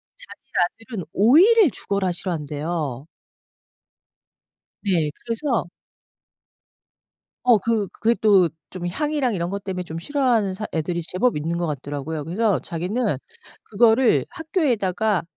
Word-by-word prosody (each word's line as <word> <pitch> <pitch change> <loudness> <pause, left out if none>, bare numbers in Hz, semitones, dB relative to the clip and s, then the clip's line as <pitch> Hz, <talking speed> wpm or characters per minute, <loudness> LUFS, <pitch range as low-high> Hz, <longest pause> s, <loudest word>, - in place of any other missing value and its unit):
자기 - - -11 0.4
아들은 220 -8 -6
오이를 340 - +6
죽어라 200 -2 -1
싫어한대요. 155 -5 -4 1.8
네. 170 -7 +1
그래서 235 - 0 1.8
어. 245 -3 +6
그 215 0 0
그게 225 +5 0
또 195 -5 +5 0.2
좀 180 -1 -5
향이랑 290 - -1
이런 170 -1 -2
것 200 0 -5
때문에 185 -2 -3
좀 165 -1 -6
싫어하는 240 - +1
사 210 +3 -5
애들이 170 +2 -1
제법 185 +9 0
있는 165 +3 -2
것 170 0 -1
같더라고요. 145 +1 -4
그래서 190 +2 +1
자기는 180 - -2 0.5
그거를 225 +3 +3
학교에다가 220 - 0
195 Hz, 265 characters per minute, -23 LUFS, 170-235 Hz, 1.8 s, 오이를